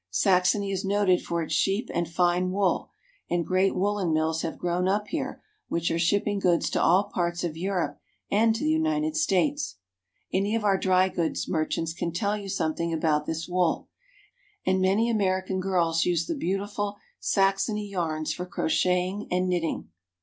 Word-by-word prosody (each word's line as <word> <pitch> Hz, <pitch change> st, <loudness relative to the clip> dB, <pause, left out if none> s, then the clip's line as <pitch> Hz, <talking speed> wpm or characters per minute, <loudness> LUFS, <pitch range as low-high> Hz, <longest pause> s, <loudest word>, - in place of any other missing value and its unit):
Saxony 190 Hz, -, +2 dB
is 190 Hz, -, -2 dB
noted 195 Hz, -2 st, +2 dB
for 170 Hz, -1 st, -2 dB
its -, -, -4 dB
sheep 200 Hz, +5 st, +1 dB
and 170 Hz, -1 st, -1 dB
fine 175 Hz, +1 st, +2 dB
wool, 190 Hz, 0 st, 0 dB, 0.4 s
and 175 Hz, -1 st, 0 dB
great 185 Hz, +1 st, +2 dB
woolen 200 Hz, -2 st, 0 dB
mills 160 Hz, +1 st, +1 dB
have 160 Hz, -, -4 dB
grown 175 Hz, +1 st, 0 dB
up 210 Hz, +2 st, 0 dB
here -, -, -4 dB, 0.2 s
which 170 Hz, 0 st, -1 dB
are 165 Hz, -, 0 dB
shipping 205 Hz, +4 st, +1 dB
goods 175 Hz, -3 st, +2 dB
to -, -, +1 dB
all 185 Hz, +4 st, +5 dB
parts 175 Hz, -1 st, -1 dB
of 165 Hz, -3 st, -2 dB
Europe 180 Hz, +1 st, -2 dB, 0.3 s
and 220 Hz, +2 st, +4 dB
to 235 Hz, -, -3 dB
the 310 Hz, -, +2 dB
United 315 Hz, -1 st, +1 dB
States. 170 Hz, -, +1 dB, 0.6 s
Any 200 Hz, +3 st, +1 dB
of 225 Hz, -, -1 dB
our 195 Hz, -2 st, +3 dB
dry 185 Hz, 0 st, +3 dB
goods 170 Hz, -3 st, -2 dB
merchants 160 Hz, 0 st, -1 dB
can 170 Hz, 0 st, -3 dB
tell 200 Hz, +5 st, 0 dB
you 200 Hz, -2 st, -6 dB
something 170 Hz, -2 st, -1 dB
about 155 Hz, -2 st, +1 dB
this 160 Hz, 0 st, -3 dB
wool, 180 Hz, -2 st, 0 dB, 0.8 s
and 185 Hz, 0 st, +2 dB
many 195 Hz, +5 st, +3 dB
American 190 Hz, -4 st, 0 dB
girls 170 Hz, -3 st, +1 dB
use 170 Hz, -2 st, +1 dB
the -, -, -2 dB
beautiful 205 Hz, -, -2 dB, 0.2 s
Saxony 195 Hz, +2 st, +1 dB
yarns 160 Hz, -5 st, -2 dB
for 180 Hz, 0 st, -6 dB
crocheting 180 Hz, +4 st, 0 dB
and 180 Hz, +1 st, +1 dB
knitting. 170 Hz, -, -1 dB
185 Hz, 170 wpm, -26 LUFS, 170-200 Hz, 0.8 s, all